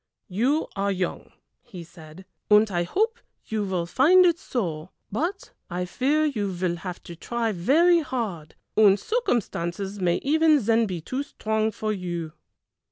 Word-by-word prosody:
"You 250 Hz, -, +1 dB
are 200 Hz, 0 st, 0 dB
young," 185 Hz, -2 st, -3 dB, 0.3 s
he 200 Hz, -9 st, -10 dB
said, 165 Hz, +1 st, -14 dB, 0.2 s
"and 210 Hz, 0 st, +5 dB
I 175 Hz, -1 st, 0 dB
hope 440 Hz, -, 0 dB, 0.3 s
you 220 Hz, -1 st, -2 dB
will 185 Hz, -3 st, -2 dB
find 315 Hz, -, +5 dB
it 340 Hz, -1 st, +3 dB
so, 170 Hz, -9 st, -3 dB, 0.2 s
but 345 Hz, -, -3 dB, 0.2 s
I 180 Hz, 0 st, -2 dB
fear 280 Hz, +11 st, +1 dB
you 220 Hz, -9 st, -1 dB
will 175 Hz, -2 st, 0 dB
have 180 Hz, +1 st, -7 dB
to 170 Hz, -, -9 dB
try 230 Hz, +5 st, -2 dB
very 315 Hz, -, +4 dB
hard, 220 Hz, -, -4 dB, 0.2 s
and 205 Hz, -2 st, +5 dB
circumstances 200 Hz, -, -2 dB
may 175 Hz, -2 st, +2 dB
even 310 Hz, +1 st, +4 dB
then 225 Hz, +1 st, +3 dB
be 180 Hz, -4 st, -4 dB
too 255 Hz, -, -3 dB
strong 220 Hz, -6 st, -1 dB
for 215 Hz, 0 st, -3 dB
you." 175 Hz, -5 st, -5 dB
210 Hz, 155 wpm, -25 LUFS, 180-275 Hz, 0.3 s, and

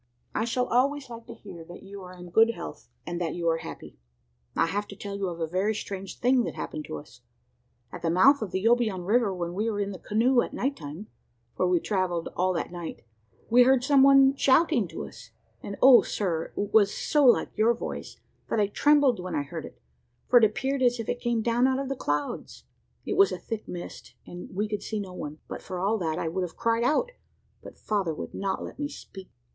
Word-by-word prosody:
I 220 Hz, -, 0 dB
shall 250 Hz, +2 st, 0 dB
always 270 Hz, +2 st, 0 dB
like 230 Hz, 0 st, -9 dB
to -, -, -9 dB
hear 180 Hz, -5 st, -11 dB
that 175 Hz, -, -12 dB
you 195 Hz, 0 st, -10 dB
are 180 Hz, 0 st, -11 dB
in 180 Hz, -1 st, -11 dB
good 225 Hz, +4 st, +4 dB
health, 60 Hz, -5 st, -9 dB, 0.2 s
and 175 Hz, 0 st, -4 dB
that 165 Hz, -2 st, -2 dB
you 170 Hz, -1 st, -2 dB
are 165 Hz, 0 st, +1 dB
happy. -, -, -10 dB, 0.6 s
"I -, -, +3 dB
have 205 Hz, +5 st, -2 dB
to 200 Hz, -, -10 dB
tell 200 Hz, 0 st, -6 dB
you 200 Hz, -1 st, -2 dB
of 170 Hz, -1 st, -7 dB
a 165 Hz, -, 0 dB
very 190 Hz, +6 st, 0 dB
strange 195 Hz, -2 st, -6 dB
thing 250 Hz, 0 st, +3 dB
that -, -, -5 dB
happened 155 Hz, -1 st, -5 dB
to 75 Hz, -, -6 dB
us. -, -, -14 dB, 0.7 s
At -, -, -8 dB
the 170 Hz, -, 0 dB
mouth 250 Hz, -, +5 dB
of 215 Hz, -, -3 dB
the 190 Hz, +3 st, -3 dB
Obion 225 Hz, -6 st, +2 dB
river, 220 Hz, +1 st, +2 dB
when 175 Hz, -2 st, -4 dB
we 215 Hz, +5 st, -1 dB
were 205 Hz, -2 st, -2 dB
in 200 Hz, 0 st, -1 dB
the 185 Hz, -, -8 dB
canoe 240 Hz, +4 st, +2 dB
at -, -, -5 dB
night 275 Hz, +2 st, -1 dB
time 155 Hz, -, -8 dB, 0.5 s
for 185 Hz, -, +1 dB
we 180 Hz, -1 st, +3 dB
travelled 180 Hz, -3 st, -1 dB
all 185 Hz, +1 st, +1 dB
that 170 Hz, -, -3 dB
night 175 Hz, -2 st, -7 dB, 0.5 s
we 245 Hz, +2 st, +7 dB
heard 255 Hz, 0 st, +5 dB
some 275 Hz, 0 st, +4 dB
one 275 Hz, 0 st, +6 dB
shouting 275 Hz, -, +3 dB
to -, -, -6 dB
us, 115 Hz, +1 st, -12 dB, 0.3 s
and 200 Hz, -, -6 dB
O 260 Hz, -2 st, +9 dB
Sir! 170 Hz, -6 st, -2 dB
it 205 Hz, 0 st, -3 dB
was 205 Hz, -2 st, +5 dB
so 295 Hz, -2 st, +1 dB
like 250 Hz, -3 st, +4 dB
your 230 Hz, +2 st, +3 dB
voice -, -, -7 dB, 0.3 s
that 225 Hz, -, 0 dB
I 205 Hz, -, +4 dB
trembled 280 Hz, +2 st, +3 dB
when 180 Hz, 0 st, -4 dB
I 145 Hz, -, 0 dB
heard 140 Hz, -, -7 dB
it, -, -, -13 dB, 0.5 s
for 245 Hz, -, +7 dB
it 225 Hz, -, +6 dB
appeared 265 Hz, +6 st, -1 dB
as 245 Hz, -1 st, +3 dB
if 230 Hz, -, -4 dB
it 245 Hz, -, -2 dB
came 235 Hz, -2 st, 0 dB
down 240 Hz, +2 st, +3 dB
out 260 Hz, 0 st, +1 dB
of 275 Hz, -1 st, -3 dB
the 275 Hz, -, -2 dB
clouds. 145 Hz, -, -3 dB, 0.4 s
It 405 Hz, -, -2 dB
was 395 Hz, 0 st, +6 dB
a -, -, -3 dB
thick 225 Hz, -2 st, -6 dB
mist, 175 Hz, -1 st, -8 dB
and 175 Hz, 0 st, -9 dB
we 210 Hz, +2 st, 0 dB
could 210 Hz, -1 st, -3 dB
see 215 Hz, -, -4 dB
no 190 Hz, -3 st, -6 dB
one; 150 Hz, -4 st, -6 dB
but -, -, -7 dB
for 185 Hz, -, -6 dB
all 205 Hz, +4 st, +1 dB
that, 160 Hz, -3 st, -2 dB
I 165 Hz, -, -2 dB
would 180 Hz, +4 st, -2 dB
have 180 Hz, -2 st, -5 dB
cried 230 Hz, 0 st, +1 dB
out, 305 Hz, -, +1 dB, 0.5 s
but -, -, -12 dB
father 195 Hz, -7 st, -1 dB
would -, -, -7 dB
not 195 Hz, 0 st, -2 dB
let -, -, -9 dB
me 290 Hz, -, -1 dB
speak. 195 Hz, -9 st, -11 dB
205 Hz, 235 wpm, -27 LUFS, 180-245 Hz, 0.7 s, O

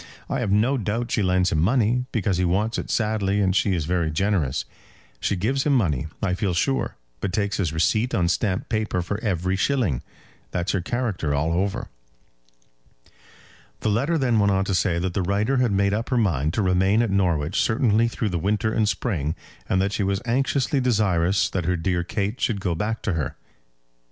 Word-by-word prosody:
I -, -, 0 dB
have -, -, -1 dB
no 115 Hz, +7 st, +2 dB
doubt 115 Hz, +3 st, -2 dB
she 110 Hz, -, +1 dB
lends 90 Hz, -1 st, +2 dB
him 80 Hz, -, +1 dB
money, 120 Hz, +5 st, +2 dB
because 100 Hz, -5 st, 0 dB
he 90 Hz, -, +1 dB
wants 100 Hz, +6 st, 0 dB
it -, -, -6 dB
sadly 105 Hz, -3 st, 0 dB
and 95 Hz, -2 st, +2 dB
she 100 Hz, -1 st, +2 dB
is 80 Hz, -4 st, -2 dB
very 85 Hz, -1 st, 0 dB
generous. 80 Hz, -5 st, 0 dB, 0.5 s
She -, -, 0 dB
gives 125 Hz, +9 st, 0 dB
him 145 Hz, -, +2 dB
money, 80 Hz, -, +1 dB, 0.2 s
I 95 Hz, -2 st, +1 dB
feel 90 Hz, -1 st, -1 dB
sure, 135 Hz, +9 st, 0 dB, 0.2 s
but 95 Hz, -, -2 dB
takes 100 Hz, +1 st, -1 dB
his 90 Hz, -6 st, 0 dB
receipt 110 Hz, +9 st, +1 dB
on 85 Hz, -2 st, +2 dB
stamped 95 Hz, +2 st, 0 dB
paper 110 Hz, -5 st, -1 dB
for 100 Hz, +4 st, -3 dB
every 95 Hz, -4 st, 0 dB
shilling. 100 Hz, -, 0 dB, 0.5 s
That's 90 Hz, +2 st, -1 dB
her 95 Hz, -, 0 dB
character 95 Hz, -, -1 dB
all 80 Hz, +3 st, 0 dB
over." 95 Hz, +3 st, -1 dB, 1.9 s
The -, -, 0 dB
letter 140 Hz, +11 st, +1 dB
then 125 Hz, -6 st, +2 dB
went 100 Hz, -1 st, +3 dB
on 95 Hz, 0 st, +1 dB
to 100 Hz, -, -1 dB
say 90 Hz, -2 st, +1 dB
that 90 Hz, +1 st, -2 dB
the 95 Hz, -, 0 dB
writer 100 Hz, +8 st, +1 dB
had 125 Hz, -3 st, +2 dB
made 100 Hz, 0 st, +2 dB
up 110 Hz, +3 st, -2 dB
her 125 Hz, -, +1 dB
mind 85 Hz, -, +1 dB
to 110 Hz, -, +1 dB
remain 95 Hz, +4 st, +3 dB
at 115 Hz, -, -1 dB
Norwich 90 Hz, -5 st, +1 dB
certainly 115 Hz, 0 st, +2 dB
through 110 Hz, -2 st, -2 dB
the 90 Hz, -2 st, -2 dB
winter 105 Hz, +5 st, 0 dB
and 110 Hz, -2 st, +2 dB
spring, 90 Hz, -, -1 dB, 0.3 s
and 95 Hz, -, +2 dB
that 100 Hz, -, 0 dB
she -, -, -1 dB
was 95 Hz, 0 st, 0 dB
anxiously 135 Hz, +2 st, +1 dB
desirous 100 Hz, -6 st, +2 dB
that 90 Hz, -4 st, -2 dB
her 90 Hz, +1 st, +1 dB
dear 85 Hz, +1 st, 0 dB
Kate 100 Hz, +5 st, -3 dB
should 105 Hz, -4 st, 0 dB
go 90 Hz, -3 st, -1 dB
back 105 Hz, +7 st, -3 dB
to 100 Hz, -, 0 dB
her. 80 Hz, -5 st, -2 dB
100 Hz, 200 wpm, -24 LUFS, 90-110 Hz, 1.9 s, went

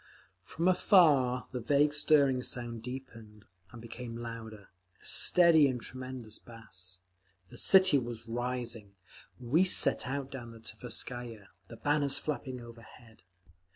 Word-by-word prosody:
From 170 Hz, +2 st, -3 dB
afar 145 Hz, -10 st, +4 dB
the 125 Hz, -, -4 dB
vague 145 Hz, +5 st, +2 dB
stirring 145 Hz, -3 st, +3 dB
sound 120 Hz, -2 st, -4 dB
deepened 115 Hz, -4 st, -10 dB, 0.3 s
and 120 Hz, -, -11 dB
became 115 Hz, 0 st, -8 dB
louder, 115 Hz, -3 st, -8 dB, 0.3 s
a -, -, -22 dB
steady 170 Hz, -5 st, +5 dB
and 130 Hz, -2 st, -2 dB
tremendous 130 Hz, -3 st, -7 dB
bass. 95 Hz, -5 st, -8 dB, 0.5 s
The -, -, -12 dB
city 185 Hz, -7 st, +6 dB
was 120 Hz, -2 st, -7 dB
rising. 120 Hz, -3 st, -4 dB, 0.4 s
We 130 Hz, +9 st, +2 dB
set 180 Hz, -8 st, +2 dB
out 135 Hz, 0 st, -4 dB
down 120 Hz, -3 st, -8 dB
the 115 Hz, -, -13 dB
Tverskaya, 115 Hz, -2 st, -6 dB, 0.2 s
the 115 Hz, -, -11 dB
banners 145 Hz, 0 st, +2 dB
flapping 130 Hz, -4 st, -4 dB
overhead. 115 Hz, -1 st, -15 dB
125 Hz, 125 wpm, -31 LUFS, 115-140 Hz, 0.5 s, city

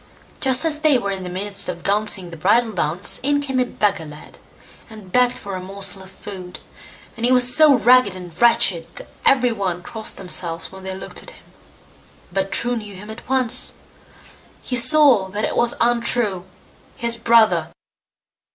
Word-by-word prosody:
Just 260 Hz, +2 st, +1 dB
as 305 Hz, -2 st, -1 dB
they 305 Hz, -3 st, +3 dB
were 200 Hz, -5 st, -3 dB
in 190 Hz, -1 st, -5 dB
the 180 Hz, -, -7 dB
midst 200 Hz, +2 st, -2 dB
of 175 Hz, -1 st, -6 dB
dancing 200 Hz, -3 st, -1 dB
the -, -, -8 dB
bridal 220 Hz, +8 st, +1 dB
dance 175 Hz, -1 st, -1 dB
in 285 Hz, +2 st, +1 dB
came 270 Hz, -2 st, -2 dB
a 250 Hz, -, +2 dB
beggar 205 Hz, -8 st, -2 dB
lad, 150 Hz, 0 st, -14 dB, 0.5 s
and 215 Hz, -4 st, -13 dB
begged 250 Hz, +3 st, +2 dB
for 200 Hz, -, -8 dB
a 185 Hz, -, -5 dB
morsel 195 Hz, +1 st, -2 dB
of 190 Hz, -, -13 dB
food, 190 Hz, -2 st, -10 dB, 0.6 s
and 230 Hz, -, -9 dB
he 245 Hz, -, +2 dB
was 250 Hz, 0 st, +6 dB
so 305 Hz, -3 st, +7 dB
ragged 250 Hz, -6 st, +4 dB
and 180 Hz, -2 st, -10 dB
wretched 230 Hz, -8 st, +3 dB
that -, -, -10 dB, 0.2 s
every 250 Hz, -2 st, +3 dB
one 185 Hz, -5 st, -4 dB
crossed 220 Hz, +3 st, -4 dB
themselves 170 Hz, -2 st, -2 dB
when 190 Hz, 0 st, -12 dB
they 190 Hz, 0 st, -6 dB
looked 190 Hz, -, -8 dB
at -, -, -8 dB
him; -, -, -15 dB, 0.9 s
but 195 Hz, 0 st, -2 dB
True 245 Hz, +1 st, 0 dB
knew 210 Hz, -3 st, -8 dB
him 210 Hz, +3 st, -10 dB
at 220 Hz, -, -12 dB
once, 260 Hz, -3 st, 0 dB, 1.0 s
and 250 Hz, -, +3 dB
saw 255 Hz, -5 st, +5 dB
that 205 Hz, +3 st, -3 dB
it -, -, -4 dB
was 240 Hz, 0 st, +2 dB
Untrue, 235 Hz, -5 st, -1 dB, 0.5 s
his 235 Hz, -1 st, 0 dB
brother. 230 Hz, -1 st, +3 dB
210 Hz, 180 wpm, -20 LUFS, 190-245 Hz, 1.0 s, so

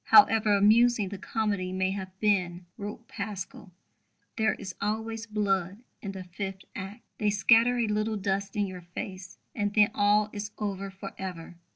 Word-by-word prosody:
"However 220 Hz, -, +6 dB
amusing 220 Hz, 0 st, +5 dB
the 200 Hz, -1 st, -6 dB
comedy 200 Hz, -3 st, -1 dB
may 190 Hz, 0 st, 0 dB
have 190 Hz, -1 st, -6 dB
been," 180 Hz, -4 st, +1 dB
wrote 210 Hz, +3 st, -7 dB
Pascal, 200 Hz, -3 st, -6 dB, 0.6 s
"there 220 Hz, -1 st, +2 dB
is 185 Hz, -, -7 dB
always 220 Hz, +2 st, -2 dB
blood 200 Hz, -1 st, 0 dB, 0.2 s
in 200 Hz, -1 st, -5 dB
the 190 Hz, -1 st, -6 dB
fifth 190 Hz, +1 st, -6 dB
act. 200 Hz, +4 st, -7 dB, 0.2 s
They 210 Hz, -, +2 dB
scatter 225 Hz, +4 st, +5 dB
a 235 Hz, -, +2 dB
little 215 Hz, 0 st, 0 dB
dust 195 Hz, 0 st, -1 dB
in 205 Hz, -1 st, +2 dB
your 185 Hz, -2 st, -7 dB
face; 185 Hz, +2 st, -7 dB, 0.2 s
and 205 Hz, -2 st, -1 dB
then 210 Hz, -1 st, +6 dB
all 210 Hz, +1 st, +3 dB
is 205 Hz, 0 st, -4 dB
over 200 Hz, -2 st, -3 dB
for 195 Hz, +1 st, -8 dB
ever." 175 Hz, -3 st, -6 dB
205 Hz, 165 wpm, -28 LUFS, 190-215 Hz, 0.6 s, However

